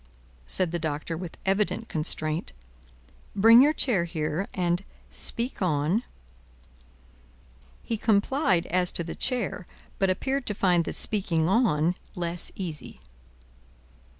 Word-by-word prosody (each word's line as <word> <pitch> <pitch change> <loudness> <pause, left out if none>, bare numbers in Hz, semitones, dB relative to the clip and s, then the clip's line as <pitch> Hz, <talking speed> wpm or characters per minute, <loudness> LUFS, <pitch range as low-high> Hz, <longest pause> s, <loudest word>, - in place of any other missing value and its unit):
said 180 - +2
the 175 - -2
Doctor, 155 +1 -3
with 170 0 -8
evident 205 +3 0
constraint. 155 - 0 0.8
"Bring 225 +4 +7
your 290 +3 +5
chair 235 - +1
here, 160 +2 -3
and 175 0 -1 0.3
speak 235 0 0
on." 165 +4 +1 1.8
He 225 - -3
complied 205 - +1
as 180 0 +3
to 170 - -1
the 165 - -6
chair, 225 -7 -3 0.3
but 195 - +2
appeared 265 +8 -1
to 210 - -2
find 180 -4 +2
the - - -3
speaking 175 -6 +1
on 180 -6 +2 0.2
less 175 -1 -1
easy. 170 -6 -7
180 Hz, 120 wpm, -26 LUFS, 165-215 Hz, 1.8 s, Bring